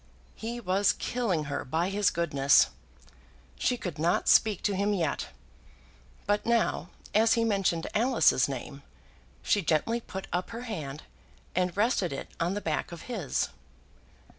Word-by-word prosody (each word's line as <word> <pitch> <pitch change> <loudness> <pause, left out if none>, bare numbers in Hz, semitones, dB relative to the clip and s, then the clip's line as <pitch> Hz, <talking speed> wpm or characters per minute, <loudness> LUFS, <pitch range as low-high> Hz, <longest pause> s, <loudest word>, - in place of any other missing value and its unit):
He 235 +2 -5
was 195 -1 +2
killing 210 -11 -1
her 145 -1 -3
by 165 +7 -1
his 205 0 +3
goodness. 145 -5 +3 0.9
She 250 - +1
could 175 -9 -6
not 170 +3 +1
speak 215 -4 +4
to 205 - +1
him 205 +2 +1
yet; 165 -6 -1 1.0
but 205 0 +1
now, 230 -6 +1 0.2
as 220 +2 +5
he 230 - +2
mentioned 195 -6 +1
Alice's 230 - +3
name, 140 +1 -6 0.6
she 205 - +2
gently 175 +8 +1
put 190 -3 -7
up 180 +1 -1
her 230 +1 -6
hand 155 - -5 0.5
and 180 +1 0
rested 205 -5 +2
it 135 - -6
on 175 +3 0
the 205 - -3
back 155 -1 -2
of 170 - -8
his. 200 - -2
190 Hz, 145 wpm, -29 LUFS, 160-220 Hz, 1.0 s, as